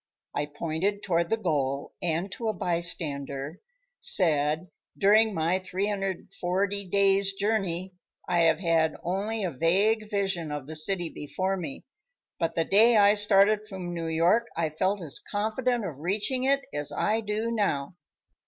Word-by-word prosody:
I 145 0 -2
pointed 165 +7 -2
toward 170 -2 0
the 225 - +1
goal, 140 -8 -2
and 170 +3 -1
to 230 - -4
a 215 - +1
bystander, 160 -5 -3 0.4
said: 155 -1 +3 0.3
"During 215 +2 +4
my 165 +4 +1
340 195 0 -2
days' 195 0 +3
journey, 195 -3 -1 0.3
I 175 -1 +1
have 165 -1 +3
had 165 -3 +2
only 205 +5 -2
a 180 - -1
vague 200 - +1
vision 195 -6 -1
of 145 -2 -5
the 160 +3 -8
city 175 +2 +2
before 185 +7 -3
me, 160 -7 -6 0.5
but 165 - -1
the 165 - +1
day 220 +5 +5
I 205 0 +6
started 210 0 +4
from 180 -3 -6
New 165 -1 -4
York 170 +9 +2
I 160 -2 0
felt 185 +4 -1
as 150 -4 -3
confident 220 +3 -1
of 150 -7 -6
reaching 210 - -1
it 275 +1 +3
as 145 -1 -1
I 220 +2 0
do 215 +2 -2
now." 195 -9 -1
185 Hz, 150 wpm, -27 LUFS, 165-205 Hz, 0.5 s, I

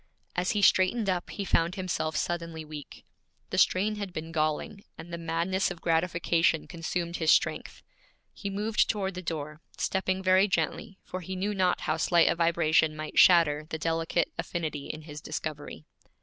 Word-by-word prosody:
As 180 +1 0
he 205 - +1
straightened 195 +3 +4
up 180 -1 -3
he 200 - -4
found 170 0 +1
himself 165 -4 -2
suddenly 165 -2 -3
weak. 150 -2 -10 0.5
The - - +1
strain 210 +3 +3
had 200 -2 -5
been 160 0 -6
galling, 155 +6 -1
and 170 +1 -10
the - - -2
madness 170 +3 0
of 175 -3 -7
gratification 165 -1 +1
consumed 170 0 -3
his 160 -2 +3
strength. - - +1 0.5
He 200 - -5
moved 210 +2 +1
toward 195 -3 -1
the 180 - -6
door, 155 -2 -5 0.2
stepping 190 0 -1
very 185 +1 +5
gently, 200 0 -2
for 185 - -6
he 185 +2 -6
knew 200 +3 -1
not 185 -2 +1
how 155 - -1
slight 170 +1 +4
a - - +3
vibration 165 -2 +2
might 155 0 -2
shatter 155 -4 +5
the 160 - -3
delicate 165 +1 0
affinity 155 -4 -3
in 155 - -6
his 150 -1 -9
discovery. 150 - -6
170 Hz, 170 wpm, -28 LUFS, 160-185 Hz, 0.5 s, very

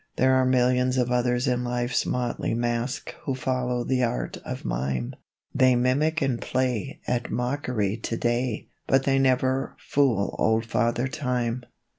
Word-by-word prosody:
There 130 +1 +3
are 130 -1 +3
millions 125 0 +2
of 125 -1 +1
others 125 +1 +1
in 125 -1 +1
Life's 120 0 -1
Motley 120 -2 -1
Masque 120 +2 -2
Who 135 - -1
follow 125 -2 -1
the 130 0 +1
art 120 0 -2
of - - -6
mime. 65 -1 -2 0.4
They 130 -1 +4
mimic 145 +6 +2
and 130 -3 0
play 130 +2 -1
At 120 -1 -1
mockery 125 -5 -1
today, 120 0 -1 0.2
But 135 0 +3
they 135 0 +2
never 130 0 +1
fool 125 -8 +1
Old 110 +1 +2
Father 120 +2 0
Time. 125 -3 -2
125 Hz, 145 wpm, -26 LUFS, 120-130 Hz, 0.4 s, They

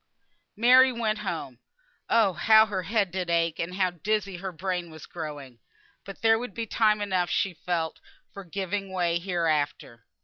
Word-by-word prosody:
Mary 255 +3 +6
went 220 -3 -1
home. 165 - -5 0.5
Oh! 220 -5 +3
how 220 +6 +6
her 200 -4 -3
head 200 +1 0
did 180 -1 -3
ache, 165 -1 +1
and 175 +2 -3
how 185 -2 +1
dizzy 195 +2 -2
her 190 +1 -5
brain 180 0 -3
was 160 -2 -11
growing! 145 -7 -8 0.5
But 195 +2 -10
there 225 0 +5
would 240 -5 -7
be 230 - -3
time 215 -1 +2
enough 185 -4 0
she 195 - 0
felt 165 -1 -3 0.3
for 200 - -8
giving 195 +2 -4
way, 175 -2 0
hereafter. 155 - -2
185 Hz, 165 wpm, -26 LUFS, 170-210 Hz, 0.5 s, Mary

